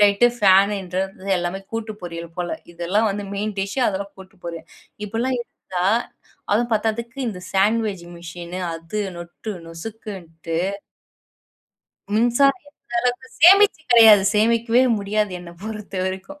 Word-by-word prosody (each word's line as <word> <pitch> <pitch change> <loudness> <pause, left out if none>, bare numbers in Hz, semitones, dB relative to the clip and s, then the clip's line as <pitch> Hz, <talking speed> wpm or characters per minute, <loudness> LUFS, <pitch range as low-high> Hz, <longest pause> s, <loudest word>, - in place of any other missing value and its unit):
ளைட் 205 +3 +5
ஃபேன்றது 195 -2 +2
எல்லாமே 175 +2 -3
கூட்டு 225 -1 -3
பொரியல் 170 -1 -6
போல. 175 -1 -2 0.2
இதெல்லாம் 180 +6 +1
வந்து 205 +1 -4
மெயின் 210 +1 -2
டிஷ், 195 +3 -2
அதெல்லாம் 200 0 -4
கூட்டு 190 +1 -14
பொரியல். 170 -1 -6 0.4
இப்படிலாம் 235 +5 -1
இருந்தா, 185 -6 -5 0.7
அதுவும் 235 +3 +1
பத்தாததுக்கு 230 +3 -2
இந்த 185 -4 -6
சாண்ட்வேஜ் 205 -1 +1
மிஷின் 170 +1 -8 0.2
அது 165 +6 -5 0.2
நொட்டு 175 +5 -7
நொசுக்குன்ட்டு 165 -3 -6 1.5
மின்சாரம் 260 - +3
எந்த 240 -4 -14
அளவுக்கு 250 +1 -1
சேமிச்சு 390 +2 +7
கிடையாது. 220 -4 +8
சேமிக்கவே 230 +3 +3 0.2
முடியாது 205 0 -1
என்ன 175 -1 -10
பொறுத்தவரைக்கும். 200 +4 -5
205 Hz, 115 wpm, -22 LUFS, 180-225 Hz, 1.5 s, கிடையாது